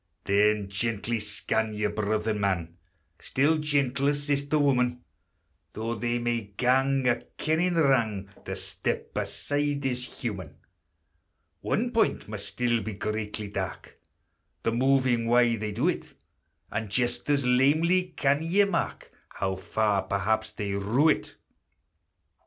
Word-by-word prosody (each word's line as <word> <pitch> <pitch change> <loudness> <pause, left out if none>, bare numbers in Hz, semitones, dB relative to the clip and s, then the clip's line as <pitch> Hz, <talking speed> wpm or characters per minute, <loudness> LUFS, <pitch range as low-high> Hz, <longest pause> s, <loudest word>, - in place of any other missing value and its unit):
Then 105 0 +3
gently 110 +3 -1
scan 105 +1 -1
your 105 0 0
brother 110 +1 0
man, 95 -5 -1 0.4
Still 155 +4 +2
gentler 145 -1 +1
sister 145 +1 0
woman; 125 -4 +2 0.7
Though 115 +2 -3
they 120 +2 -1
may 120 -1 0 0.2
gang 135 +2 +2
a 120 - +4 0.2
kennin' 170 +3 +1
wrang, 115 -10 +2 0.2
To - - -4
step - - -4
aside 145 -1 -1
is 125 -1 -1
human. 100 - -6 1.0
One 240 +3 -1
point 230 -2 +1
must 105 -1 -4
still 120 +2 0
be 110 +1 -5
greatly 105 +1 -3
dark, - - -5 0.6
The 115 - +1
moving 125 -1 +2
why 120 0 +4
they 105 0 -3
do 120 - 0
it; 180 - -1 0.6
And 110 -1 -3
just 120 +4 0
as 140 -3 +2
lamely 155 +9 +3
can 140 +1 +2
ye 175 +5 +3
mark 195 -4 -2 0.2
How 95 -1 -2
far 100 +1 0
perhaps 110 +3 0
they 105 -2 -4
rue 105 +10 +2
it. - - 0
120 Hz, 130 wpm, -27 LUFS, 105-140 Hz, 1.0 s, a